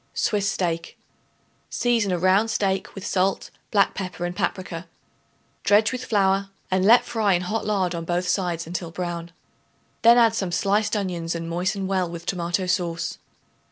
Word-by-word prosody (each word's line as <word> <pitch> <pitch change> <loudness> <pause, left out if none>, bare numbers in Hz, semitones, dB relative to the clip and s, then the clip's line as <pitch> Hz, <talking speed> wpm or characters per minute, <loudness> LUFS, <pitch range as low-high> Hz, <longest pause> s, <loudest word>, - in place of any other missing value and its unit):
Swiss 200 -1 +1
Steak. 170 -3 -3 0.7
Season 230 -5 +1
a 180 - +1
round 190 +5 +3
steak 195 -3 -1
with 195 - -7
salt, 190 0 0 0.2
black 200 -2 +3
pepper 185 -2 -4
and 175 0 -4
paprica; 175 -2 -3 0.8
dredge 210 +2 +4
with 255 -1 -4
flour 195 -2 +2 0.2
and 185 0 +2
let 230 +5 +6
fry 215 -4 +1
in 175 0 +1
hot 210 +4 -2
lard 190 -4 +1
on 170 -1 -4
both 175 +2 -1
sides 175 -4 -1
until 170 0 -4
brown. 170 0 -5 0.7
Then 235 +1 +7
add 230 -2 +5
some 190 -5 -2
sliced 205 +5 +1
onions 175 -5 -2
and 165 0 -4
moisten 185 +4 -1
well 185 -2 0
with 170 0 -8
tomato 175 +1 -1
sauce. 175 -2 -2
185 Hz, 160 wpm, -24 LUFS, 175-205 Hz, 0.8 s, Then